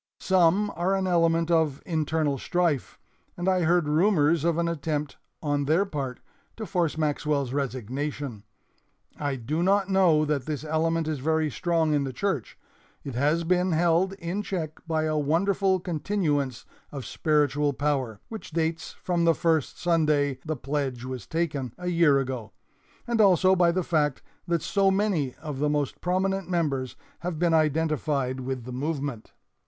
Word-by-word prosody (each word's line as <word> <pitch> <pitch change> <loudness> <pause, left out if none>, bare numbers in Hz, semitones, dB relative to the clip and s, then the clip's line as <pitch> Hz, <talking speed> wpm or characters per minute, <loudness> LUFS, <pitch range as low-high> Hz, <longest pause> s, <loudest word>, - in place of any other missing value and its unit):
Some 190 +2 +3
are 180 +3 +1
an 190 -1 0
element 165 -1 +2
of 160 -4 +2
internal 155 -4 0
strife, 170 -5 0 0.4
and 175 +1 -3
I 185 -1 +3
heard 170 -1 +2
rumors 160 -1 +3
of 170 -1 +1
an 170 0 +1
attempt 150 -2 -3 0.3
on 145 -1 0
their 165 +7 +3
part 140 -8 -5 0.4
to 220 - -4
force 170 -5 0
Maxwell's 145 -3 0
resignation. 135 -1 -3 0.8
I 145 -2 -1
do 135 +7 -2
not 195 +1 +2
know 175 -6 +4
that 145 -3 -1
this 150 -2 -3
element 160 +1 0
is 155 -3 -2
very 160 +2 +1
strong 165 0 +1
in 145 -1 +2
the 135 -1 -4
church. 150 - -2 0.5
It 140 - -6
has 150 +7 +1
been 180 +1 +2
held 170 +3 +2
in 185 +1 -3
check 165 -7 -4
by 160 -1 0
a 155 -1 0
wonderful 185 +5 +2
continuance 155 -7 -1 0.3
of 135 -3 -6
spiritual 150 -2 +1
power, 135 -6 -1
which 220 -1 -8
dates 165 0 -2
from 175 -2 +1
the 165 -1 +4
first 160 -4 0
Sunday 150 -5 +2
the 155 0 -2
pledge 135 -3 -3
was 130 -4 -6
taken 145 -7 -2
a 180 0 -3
year 165 -5 +4
ago, 130 -5 -3 0.5
and 235 -2 +1
also 190 -1 +5
by 175 -2 +4
the 185 +1 0
fact 150 -5 0 0.2
that 170 -2 0
so 195 -1 +2
many 190 -9 0
of 150 -4 -6
the 150 +1 +1
most 145 -2 -1
prominent 190 +1 0
members 145 -8 -1 0.2
have 175 -2 -4
been 170 0 +2
identified 150 -4 +1
with 130 -2 -4
the 125 - -7
movement. 140 -4 -4
155 Hz, 160 wpm, -26 LUFS, 145-175 Hz, 0.8 s, also